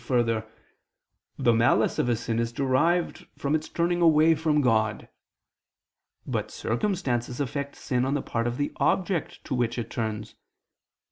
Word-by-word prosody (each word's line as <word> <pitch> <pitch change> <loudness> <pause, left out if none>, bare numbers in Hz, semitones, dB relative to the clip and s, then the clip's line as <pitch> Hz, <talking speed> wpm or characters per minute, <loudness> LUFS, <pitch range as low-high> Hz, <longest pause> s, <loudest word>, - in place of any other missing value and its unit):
3: - - -20
Further, 115 -3 +1 0.9
the 120 - +3
malice 115 +2 +3
of 125 - +1
a 120 - +3
sin 115 0 -2
is 115 0 -1
derived 140 +7 +1
from 140 +1 -1
its 155 0 -1
turning 175 +1 0
away 160 -1 +6
(from 155 -1 +1
God). 110 -5 +1 1.2
But - - -2
circumstances 125 - -2
affect 140 +1 -3
sin 125 -1 -1
on 135 +2 0
the 145 - -1
part 115 0 -1
of 120 +1 -3
the 145 - -1
object 185 -3 0
to 140 - -4
which 120 -1 0
it 120 - -4
turns. 110 -2 -3
125 Hz, 155 wpm, -26 LUFS, 115-155 Hz, 1.2 s, away